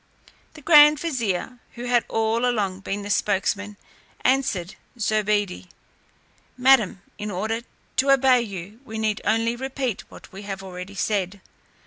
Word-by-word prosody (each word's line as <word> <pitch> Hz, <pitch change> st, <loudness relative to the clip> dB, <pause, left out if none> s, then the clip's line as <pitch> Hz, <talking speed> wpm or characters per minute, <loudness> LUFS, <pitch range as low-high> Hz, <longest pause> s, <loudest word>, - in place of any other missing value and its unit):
The 300 Hz, -, -13 dB
grand 300 Hz, -1 st, +7 dB
vizier 250 Hz, -, -2 dB, 0.2 s
who 240 Hz, -, -7 dB
had 245 Hz, -1 st, +2 dB
all 225 Hz, +1 st, 0 dB
along 205 Hz, -7 st, 0 dB
been 200 Hz, +1 st, -4 dB
the 205 Hz, -, -4 dB
spokesman, 205 Hz, +1 st, 0 dB, 0.4 s
answered 215 Hz, -9 st, +1 dB, 0.2 s
Zobeide: 210 Hz, -4 st, 0 dB, 0.9 s
"Madam, 250 Hz, -7 st, +4 dB, 0.2 s
in 210 Hz, -, -4 dB
order 215 Hz, +4 st, -2 dB, 0.4 s
to 270 Hz, +2 st, +2 dB
obey 265 Hz, -2 st, +5 dB
you, 200 Hz, 0 st, -7 dB
we 220 Hz, -4 st, -7 dB
need 215 Hz, -1 st, -1 dB
only 225 Hz, +1 st, +1 dB
repeat 265 Hz, -3 st, -4 dB
what -, -, -14 dB
we 195 Hz, -, -9 dB
have 195 Hz, -1 st, -6 dB
already 185 Hz, +1 st, -8 dB
said. 200 Hz, -1 st, -1 dB
215 Hz, 135 wpm, -24 LUFS, 200-250 Hz, 0.9 s, grand